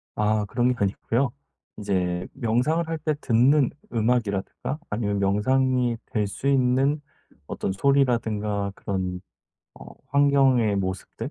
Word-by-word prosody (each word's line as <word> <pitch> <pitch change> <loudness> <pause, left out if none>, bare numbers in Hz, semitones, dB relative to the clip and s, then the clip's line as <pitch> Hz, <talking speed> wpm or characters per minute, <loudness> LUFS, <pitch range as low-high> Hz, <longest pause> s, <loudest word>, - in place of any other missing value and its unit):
아 105 0 +1
그런 120 +4 +1
게 - - -8
아니고요. 115 +6 0 0.5
이제 90 -3 -1
명상을 135 +7 0
할 165 0 -2
때 155 0 -1
듣는 130 +4 +4 0.2
음악이라든가 115 +2 -1
아니면 105 -2 -1
명상이 125 +4 +1
될 105 -2 0
수 115 +7 -4
있는 135 +2 +2 0.5
어떤 - - -3
소리라든가 105 -4 +1
그런 90 -2 -3 0.5
어 - - -13 0.2
환경의 135 -6 +3
모습들 95 -1 -4
115 Hz, 260 characters per minute, -25 LUFS, 100-135 Hz, 0.5 s, 듣는